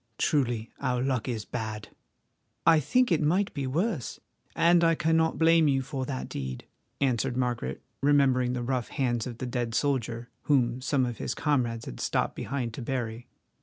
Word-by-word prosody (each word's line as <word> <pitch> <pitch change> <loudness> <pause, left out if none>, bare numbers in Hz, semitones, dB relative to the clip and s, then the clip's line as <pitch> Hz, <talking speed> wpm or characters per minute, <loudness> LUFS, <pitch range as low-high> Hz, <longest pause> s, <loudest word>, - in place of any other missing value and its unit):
Truly 120 -6 0
our 125 -1 0
luck 130 -3 -1
is 110 -3 -3
bad!" 110 -3 -5 0.8
"I 165 -1 +7
think 250 - +2
it 165 - +3
might 180 +7 +1
be 140 -3 -3
worse, 160 - -1 0.4
and 170 0 +5
I 165 0 +4
cannot 160 0 +2
blame 165 -1 +5
you 135 -2 +2
for 130 0 -4
that 130 -3 -4
deed," 65 -2 -5 0.3
answered 130 -1 +1
Margaret, 120 - -2 0.2
remembering 135 -3 +3
the 125 -1 -2
rough 125 -1 -1
hands 120 -5 -1
of 120 -2 -7
the 130 - -4
dead 120 -2 -2
soldier, 120 -4 -1
whom 125 -3 +2
some 135 0 +1
of 120 -2 -5
his - - -3
comrades 120 -6 0
had - - -8
stopped - - 0
behind 125 -5 -3
to 130 - -6
bury. 120 -2 -3
130 Hz, 170 wpm, -28 LUFS, 120-145 Hz, 0.8 s, I